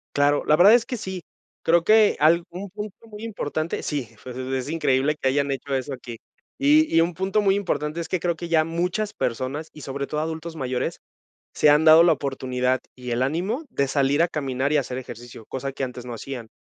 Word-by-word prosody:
Claro, 145 0 +3
la 150 - +5
verdad 200 +6 +8
es 240 - +3
que 250 - -3
sí. 190 -4 -6 0.4
Creo 170 0 +3
que 215 -1 +5
algún 170 +5 +1
punto 210 -1 -7
muy 210 0 -11
importante 165 -7 -3
sí, 140 -7 -3 0.2
pues, 125 -1 -8
es 130 +1 -3
increíble 145 -2 +1
que 135 - +2
hayan 140 +1 +1
hecho 135 0 -3
eso 135 +2 -2
aquí, 120 -2 -8 0.4
y 300 +3 +5
y 165 - +6
un 175 +1 0
punto 195 +4 0
muy 195 -1 +3
importante 170 -5 -2
es 165 - -5
que 185 - 0
creo 170 0 0
que 170 +1 -7
ya 160 -2 +3
muchas 180 +6 -2
personas 130 +6 -3
y 150 - -11
sobre 140 +1 -4
todo 150 0 -3
adultos 160 +1 -4
mayores, 130 -3 -2 0.6
se 150 - +4
han 150 +2 +5
dado 160 +1 +9
la 170 - +5
oportunidad 130 -2 -1
y 125 -1 -7
el 120 +2 +1
ánimo 185 - -1
de 140 -8 0
salir 140 +2 +2
a 170 - +4
caminar 140 -3 -2
y - - +4
hacer 130 -2 -2
ejercicio, 120 -3 -9
cosa 135 +1 -4
que 135 - -5
antes 125 -1 -8
no 120 - -6
hacían. 120 -1 -7
150 Hz, 215 wpm, -24 LUFS, 130-175 Hz, 0.6 s, dado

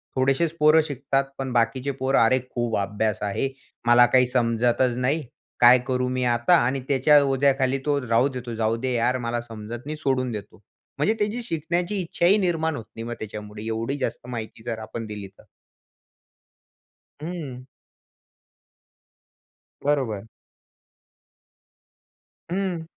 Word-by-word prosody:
थोडेसेच 135 +5 +2
पोरं 155 +1 +6
शिकतात, 140 -1 -1
पण 135 -1 -3
बाकीचे 125 +4 +1
पोर, 135 0 -1
अरे! 130 +3 +4
खूप 120 -2 -1
अभ्यास 105 +1 -1
आहे. 105 +7 -1 0.4
मला 120 0 +7
काही 125 -1 +5
समजतच 120 0 +1
नाही. 140 +5 0 0.4
काय 125 +1 +8
करू 125 -1 0
मी 130 0 -1
आता 120 -1 +3
आणि 130 +1 -1
त्याच्या 145 +2 +5
ओझ्याखाली 135 -1 +2
तो 145 -1 +2
राहू 115 +4 +3
देतो. 125 -2 -6
जाऊ 110 0 +1
दे 130 +1 -2
यार, 120 +2 +1
मला 120 -1 -2
समजत 115 +1 -8
नाही 155 +1 -4
सोडून 130 -4 0
देतो. 105 -1 -8 0.4
म्हणजे 215 - +2
त्याची 210 +4 -1
शिकण्याची 175 +2 -2
इच्छाही 175 +3 +2
निर्माण 165 -5 0
होत 115 - -6
नाही 115 - -6
मग 120 - -3
त्याच्यामुळे 105 0 -7
एवढी 115 +5 -2
जास्त 125 -2 -4
माहिती 110 -2 -7
जर 115 -2 -3
आपण 110 +1 -6
दिली 105 -2 -7
तर. - - -18 1.8
हं. 150 -7 -6 2.2
बरोबर. 125 -8 0 2.3
हं. 185 -3 -1
130 Hz, 135 wpm, -24 LUFS, 115-145 Hz, 2.3 s, काय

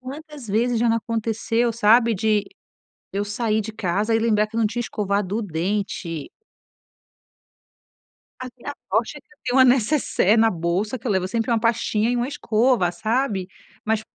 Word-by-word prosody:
Quantas 285 0 -9
vezes 235 +3 +1
já 235 +1 +2
não 230 - +3
aconteceu 230 +1 -1
sabe, 230 +1 +4
de 210 +1 +1 0.7
eu 200 +1 -1
sair 215 +1 -1
de 220 +1 -6
casa 210 +2 0
e 225 - +2
lembrar 215 -2 +2
que 225 - -11
eu - - +1
não 225 - +3
tinha 240 +3 -3
escovado 205 -2 -2
o - - -1
dente. 175 -3 -3 2.1
A 255 - -5
minha 285 +4 -7 0.2
sorte 230 +6 0
é 295 - -10
que - - -51
eu - - -43
tenho 245 - 0
uma 260 - +8
necessaire 245 -4 +3
na 225 0 +4
bolsa, 185 +7 -2
que 230 - -10
eu - - 0
levo 190 -2 +1
sempre 225 +4 -2
uma 230 - +3
pastinha 230 -1 +1
e 245 - 0
uma 240 +1 -1
escova, 230 -8 +1
sabe. 215 -2 -1 0.4
Mas 220 0 +1
225 Hz, 180 wpm, -22 LUFS, 205-240 Hz, 2.1 s, uma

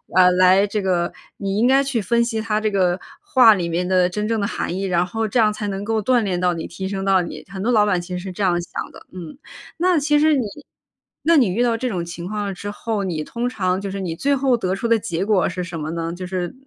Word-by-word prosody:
呃， 180 -1 +7
来 185 +2 +5
这 210 +1 -2
个 180 -3 0 0.2
你 195 0 -2
应 225 - +3
该 270 +1 +4
去 270 -5 -1
分 235 +4 +2
析 230 -2 -2
他 215 -1 0
这 215 0 0
个 185 -3 +1 0.2
话 245 -4 +6
里 175 -4 -2
面 175 +2 -1
的 185 -1 +3
真 210 +3 -3
正 225 0 0
的 200 - 0
含 175 - -3
义， 195 - -3
然 180 -2 +1
后 225 +4 -2
这 230 +4 0
样 215 -2 +4
才 210 -1 -4
能 195 0 -4
够 220 +1 0
锻 250 +4 +3
炼 190 -4 -1
到 180 0 +2
你， 165 -1 -5
提 190 +2 -6
升 195 0 -3
到 195 -1 +4
你， 170 - -7
很 190 -1 -6
多 240 - +1
老 215 -3 +4
板 195 -4 +1
其 175 - -12
实 180 - -3
是 190 +1 -6
这 190 +3 -4
样 175 -2 +2
想 170 - -6
的， - - -14
嗯。 180 +3 -9 0.4
那 360 0 +2
其 295 0 +2
实 310 0 +4
你 265 - +1 0.8
那 335 0 +4
你 255 -6 +5
遇 215 +7 +1
到 235 -2 +2
这 250 +2 -2
种 175 -6 -3
情 170 +1 -7
况 205 -1 -3
之 200 +2 -6
后， 205 0 -3
你 165 -5 -2
通 240 +8 -3
常 190 -5 -1
就 200 - -4
是 195 +1 -5
你 175 -4 -3
最 280 +10 +1
后 265 -2 +2
得 190 -5 -1
出 215 +4 -2
的 230 -1 +3
结 195 -4 -3
果 200 -4 +2
是 180 +1 -4
什 170 -1 -6
么 155 0 -4
呢？ 165 0 -3
就 180 +1 -6
是 180 -1 -3
195 Hz, 295 characters per minute, -21 LUFS, 180-225 Hz, 0.8 s, 呃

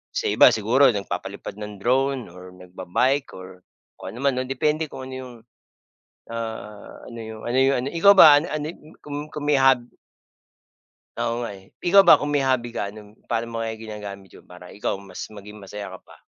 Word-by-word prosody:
sa - - -1
iba - - +7
siguro 120 +6 +4
nagpapalipad 100 -2 -5
ng 105 -1 -8
drone 130 0 +1
or 90 +1 -12
nagba-bike 95 +10 -1
or 95 0 -12 0.4
kung - - -7
anoman 130 0 0
'no, - - -1
depende 150 +4 0
kung 130 0 -8
ano 130 - -6
'yong, 130 -1 -9 1.0
ah, 110 -2 -7
ano 115 -1 -8
yung, 110 0 -9
ano 120 +2 0
yung, 135 +1 +4
ano - - 0
ikaw 200 +4 +7
ba, 145 -2 +10
an - - -5
ano 150 0 -3
y - - -12
yung 155 - -18
kung 145 -1 -6 0.2
kung 150 - -5
may 145 -1 +4
hob 135 -2 +4 1.3
Oo 120 0 -2
nga, 120 - -4
eh. 95 0 -19
Ikaw 195 +2 +6
ba, 170 - +7
kung 145 - -2
may 145 -2 +1
hobby 130 -2 +1
ka 100 0 -3
anong 105 0 -14
paano 115 0 -2
mo 115 - -2
kaya 115 - -3
ginagamit 105 -3 -8
'yon, - - -17
para 90 0 -13
ikaw 105 - -3
mas 95 -2 -8
maging 105 0 -11
masaya 100 0 -8
ka - - -22
pa? - - -17
115 Hz, 200 wpm, -23 LUFS, 105-135 Hz, 1.3 s, ba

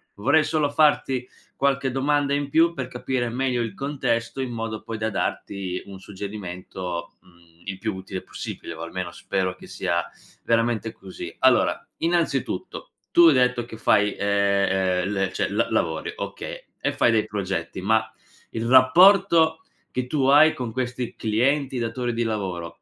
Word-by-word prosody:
Vorrei 140 +10 +3
solo 150 -2 0
farti 135 -4 +2 0.3
qualche 135 -1 +1
domanda 140 +1 +1
in 145 0 -1
più, 165 +3 +4
per 130 -4 -4
capire 125 -1 -2
meglio 125 0 -1
il 115 -3 -3
contesto, 135 -3 -2
in 130 - -3
modo 115 -1 -4
poi 115 -1 -6
da 110 0 -1
darti 95 -2 -3
un 95 -1 -10
suggerimento, 95 -3 -6
mhmm, 85 -2 -24
il 95 -1 -5
più 110 +1 -3
utile 95 0 -6
possibile, - - -7
o 80 - -9
almeno 85 +1 -5
spero 95 0 -2
che - - -14
sia 85 0 -1 0.4
veramente 115 -1 +1
così. 95 -4 -9
Allora, - - +4 0.2
innanzitutto, 165 -5 -1 0.2
tu 175 - +6
hai 155 - +7
detto 125 -2 +2
che 110 - -10
fai, 105 -2 +3
ehm, 100 -2 +1
ehm, 100 - -2
le 95 -2 0
cioè, - - -1
la-lavori, 80 -1 -1
okay, - - -6 0.2
e - - +1
fai 120 - +3
dei 110 -1 +2
progetti, 95 -4 -3
ma 110 +2 +1 0.4
il 115 0 -3
rapporto 160 +5 +6 0.3
che 125 0 -2
tu 135 -1 0
hai 150 +3 +7
con 120 -3 -5
questi 125 0 -3
clienti, 130 +4 0
datori 120 +1 -2
di 115 - -2
lavoro, 90 -6 -4
115 Hz, 160 wpm, -24 LUFS, 95-135 Hz, 0.4 s, hai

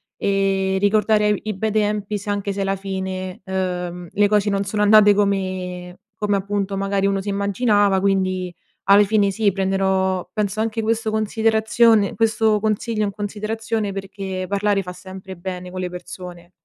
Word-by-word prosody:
e 195 -1 0
ricordare 210 +1 +3
e - - +4
vi 205 - -4
i 215 - -2
bei 220 +3 -1
tempi 210 -1 0
se 205 +1 -7
anche 200 0 -1
se 200 - -3
alla 195 0 0
fine, 190 -1 -5
uhm, 180 -2 -3
le 205 0 +3
cose 210 0 +2
non 200 0 0
sono 205 +1 -2
andate 210 0 +7
come 185 -3 -2 0.3
come, 205 -1 +2
appunto, 200 0 -2
magari 195 0 0
uno 195 0 +1
si 195 - -8
immaginava. 200 0 +2
Quindi 185 -2 0 0.3
alle 200 +1 +6
fine 205 0 +2
sì, 205 0 +1
prenderò 190 -1 0
penso 210 0 -1
anche 225 0 -1
questo 225 0 -1
considerazione 220 0 +2
questo 220 -1 +2
consiglio 215 +1 -1
in 205 - -1
considerazione 215 +1 -3
perché 195 -1 -5
parlare 200 0 +1
fa 180 0 -7
sempre 190 +1 -10
bene 180 0 -6
con 185 0 -5
le 180 - -3
persone. 180 -1 -9
200 Hz, 165 wpm, -21 LUFS, 190-210 Hz, 0.3 s, andate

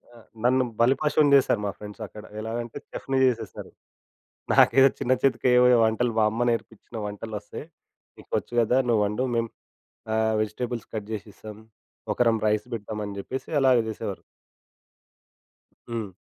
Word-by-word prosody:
ఆ! - - -14 0.3
నన్ను 130 +1 +3 0.2
బలిపశువుని 140 +4 +3
చేశారు 130 -5 +3
మా 100 - -1
ఫ్రెండ్స్ 105 +2 -10
అక్కడ. 105 +2 -12 0.2
ఎలాగంటే, 115 +2 -5
చెఫ్‌ని 135 0 -2
చేసేసారు. 115 -6 -2 0.8
నాకేదో 135 +3 +6
చిన్న 130 - +2
చితకేవో 125 -2 +4 0.2
వంటలు. 110 +2 +1
మా - - +4
అమ్మ 115 +2 -3
నేర్పించిన 115 0 -5
వంటలు 105 +2 -7
వస్తాయి. 105 +7 -9 0.5
"నీకు - - -17
వచ్చు - - -6
కదా 120 +3 +2
నువ్వు 115 -3 +3
వండు. 105 +5 -2
మేము 115 0 0 0.6
ఆహ్, 110 0 +1
వెజిటేబుల్స్ 115 +3 -4
కట్ 105 -2 -4
చేసిస్తాం. 105 0 -8 0.6
ఒకరం 115 -2 +2
రైస్ 105 +1 0
పెడతామని" 105 -2 -5
చెప్పేసి 130 +7 -6
అలాగే 130 -3 +5
చేసేవారు. 110 -3 -5 1.7
హ్మ్. 115 -3 -3
115 Hz, 135 wpm, -25 LUFS, 105-125 Hz, 1.7 s, నాకేదో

